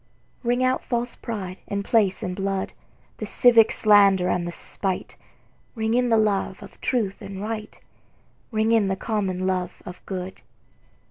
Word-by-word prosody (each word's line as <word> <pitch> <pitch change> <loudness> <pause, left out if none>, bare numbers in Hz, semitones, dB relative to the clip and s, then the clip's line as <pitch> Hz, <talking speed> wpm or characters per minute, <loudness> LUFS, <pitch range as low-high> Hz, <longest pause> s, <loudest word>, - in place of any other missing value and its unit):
Ring 245 +1 +1
out 255 0 +1
false 240 0 -2
pride 195 -5 -6
in 200 0 -2
place 210 -2 +2
and 180 -2 -3
blood, 195 0 -2 0.4
The - - -5
civic 235 -3 +5
slander 200 -4 +5
and 175 -1 0
the - - -3
spite; 190 +2 -3 0.6
Ring 220 0 0
in 245 0 +2
the 225 - +4
love 200 -3 0
of - - -14
truth 220 -7 -1
and 195 -1 -7
right, 215 +1 -5 0.7
Ring 220 0 +1
in 225 -3 +4
the 190 - 0
common 190 -3 -2
love 185 -1 -2
of 180 0 -9
good. 185 -1 -5
200 Hz, 155 wpm, -24 LUFS, 190-225 Hz, 0.7 s, civic